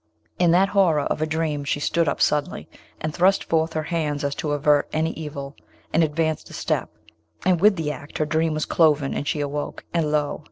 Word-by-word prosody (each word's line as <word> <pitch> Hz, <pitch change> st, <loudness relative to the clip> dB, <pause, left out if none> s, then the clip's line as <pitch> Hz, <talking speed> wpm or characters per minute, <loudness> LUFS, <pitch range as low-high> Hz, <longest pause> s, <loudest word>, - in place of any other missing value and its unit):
In 175 Hz, -1 st, +4 dB
that 185 Hz, +4 st, +4 dB
horror 180 Hz, -7 st, +3 dB
of -, -, -2 dB
her 155 Hz, -, 0 dB
dream 155 Hz, -2 st, -1 dB
she 145 Hz, 0 st, -1 dB
stood 165 Hz, +2 st, +1 dB
up -, -, -3 dB
suddenly, 145 Hz, -, 0 dB, 0.3 s
and 155 Hz, -1 st, -3 dB
thrust 190 Hz, +3 st, +3 dB
forth 160 Hz, 0 st, 0 dB
her 155 Hz, -, -1 dB
hands 150 Hz, -3 st, -2 dB
as 140 Hz, 0 st, 0 dB
to 150 Hz, 0 st, -2 dB
avert 145 Hz, 0 st, +2 dB
an 155 Hz, +1 st, 0 dB
evil, 145 Hz, -3 st, -6 dB, 0.4 s
and 165 Hz, -, +4 dB
advanced 160 Hz, 0 st, -1 dB
a -, -, -12 dB
step; -, -, -2 dB, 0.6 s
and 180 Hz, -3 st, +3 dB
with 210 Hz, 0 st, +6 dB
the 160 Hz, -4 st, -2 dB
act 145 Hz, +1 st, -8 dB
her 155 Hz, -, +1 dB
dream 160 Hz, +1 st, 0 dB
was 155 Hz, -, -1 dB
cloven 150 Hz, -4 st, +2 dB
and 145 Hz, -, -3 dB
she 150 Hz, -, -1 dB
awoke, 145 Hz, 0 st, -4 dB
and 160 Hz, -3 st, +1 dB
lo! 150 Hz, -1 st, 0 dB
155 Hz, 210 wpm, -23 LUFS, 145-165 Hz, 0.6 s, with